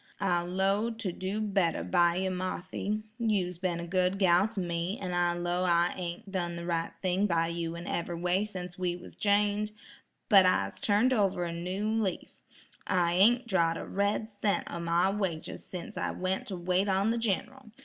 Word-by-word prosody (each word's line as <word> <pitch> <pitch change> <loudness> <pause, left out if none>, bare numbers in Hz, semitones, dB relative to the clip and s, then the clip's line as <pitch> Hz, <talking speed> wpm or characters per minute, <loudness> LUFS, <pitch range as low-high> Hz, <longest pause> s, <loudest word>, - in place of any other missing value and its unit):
"I 180 -3 +2
'low 195 +5 +1
to 225 -5 -4
do 190 +4 -3
better 195 -5 +1
by 175 -1 +3
yer, 190 +1 0
Marthy; 185 +3 -3 0.2
you's 190 -6 0
ben 175 -2 -1
a 170 - -4
good 185 +2 +1
gal 185 0 +4
to 220 -2 -6
me, 175 +3 -2
an' 180 -2 -4
I 175 0 +2
'low 175 +1 -1
I 175 -1 +3
ain't 175 +2 -6
done 175 -3 -2
the 170 0 -6
right 165 -1 -1
thing 185 +2 +2
by 165 -2 +1
you 170 0 -3
in 170 +1 -7
every 170 0 -2
way 180 +3 +1
sence 180 -4 -7
we 180 -1 0
was 175 - -12
jined, 205 +1 +1 0.6
but 200 -4 +8
I'se 185 0 +1
turned 220 +5 +3
over 195 -6 +1
a 170 -1 -3
new 180 +5 -3
leaf; 220 -3 -2 0.5
I 175 -2 +2
ain't 235 +7 +5
drawed 170 -5 +2
a - - -5
red 200 +2 0
cent 205 -1 -1
o' 170 - -4
my 170 +3 +2
wages 190 -6 -3
sence 200 +4 -8
I - - -1
went 185 +1 -2
to 195 - -4
wait 180 +3 +1
on 195 +3 +2
the 235 - 0
Gin'ral. 235 +4 -2
185 Hz, 190 wpm, -30 LUFS, 175-205 Hz, 0.6 s, but